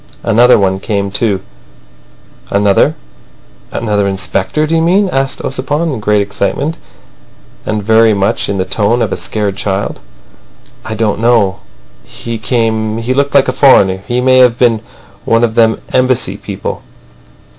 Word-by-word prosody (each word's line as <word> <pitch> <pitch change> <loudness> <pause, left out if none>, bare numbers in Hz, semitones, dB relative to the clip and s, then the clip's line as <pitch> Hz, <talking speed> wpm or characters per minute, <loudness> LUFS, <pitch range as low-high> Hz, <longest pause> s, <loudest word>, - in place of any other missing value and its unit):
"Another 120 +3 +4
one 95 -2 0
came 100 -1 -2
too." 105 -2 0 1.1
"Another—another 100 - -2
inspector, 95 +9 -1
do 160 +2 -1
you 165 - +2
mean?" 190 +5 +2
asked 135 -4 -2
Ossipon, 145 +5 -2
in 120 - -4
great 105 -1 +1
excitement, 100 +10 -2 0.9
and 105 -1 -2
very 110 0 +4
much 100 0 -1
in 100 - -1
the 95 - -1
tone 115 +4 +1
of - - -2
a - - -1
scared 105 -2 -3
child. 100 0 -3 0.8
"I 110 - -5
don't 110 -2 -1
know. 115 -5 +2 0.4
He 115 - -6
came. 110 -2 -1
He 115 +3 -1
looked 140 +1 0
like 140 - +4
a 130 - 0
foreigner. 95 -9 +4
He 120 +1 0
may 130 0 +4
have 125 -2 +4
been 115 -3 +2 0.4
one 115 +1 +2
of 115 -2 +1
them 110 -1 +2
Embassy 130 -1 +1
people." - - -6
110 Hz, 145 wpm, -13 LUFS, 100-130 Hz, 1.1 s, Another